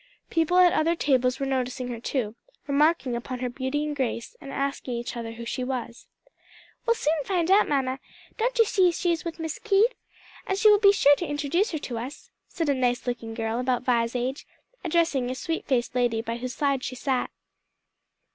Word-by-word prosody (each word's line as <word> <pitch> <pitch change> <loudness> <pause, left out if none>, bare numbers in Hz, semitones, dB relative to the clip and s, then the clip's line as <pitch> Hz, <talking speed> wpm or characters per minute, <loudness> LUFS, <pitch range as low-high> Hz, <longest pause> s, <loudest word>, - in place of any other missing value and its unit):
People 330 +2 +2
at 360 -1 +6
other 330 +2 +2
tables 255 -5 +1
were 275 - -1
noticing 255 -1 -2
her 235 -2 -5
too, 235 -3 -2 0.3
remarking 285 -2 +2
upon 245 +2 -4
her 250 0 -2
beauty 265 +4 -2
and 300 -1 -3
grace, 260 - -3
and 275 - -8
asking 275 -2 -2
each 235 +1 -4
other 230 -1 -5
who 235 0 -8
she 255 - -3
was. 250 -2 -5 0.8
"We'll 465 - +4
soon 310 -6 0
find 355 +1 0
out, 405 +2 +5
mamma; 265 -2 0 0.4
don't - - -1
you 455 - +6
see 370 -3 +3
she 345 +1 0
is 330 -2 -1
with 335 -1 -5
Miss 320 -2 -4
Keith? 440 +3 +3 0.5
and 385 - 0
she 430 +1 +6
will 415 - +5
be 400 -1 +7
sure 290 -7 +5
to 345 - -3
introduce 295 +8 0
her 320 - -3
to 235 -3 -4
us," 255 +5 -8 0.2
said 330 - -3
a 285 - +3
nice 250 -2 0
looking 235 -2 -4
girl 225 0 -2
about 250 -1 0
Vi's 235 -1 +1
age, 255 +3 -3 0.4
addressing 330 -7 +1
a 255 - -3
sweet 330 +4 -3
faced 245 -3 0
lady 240 -3 +1
by 230 0 -3
whose 250 +1 -5
side 275 -3 0
she 255 - -4
sat. 260 0 -1
270 Hz, 205 wpm, -26 LUFS, 245-330 Hz, 0.8 s, be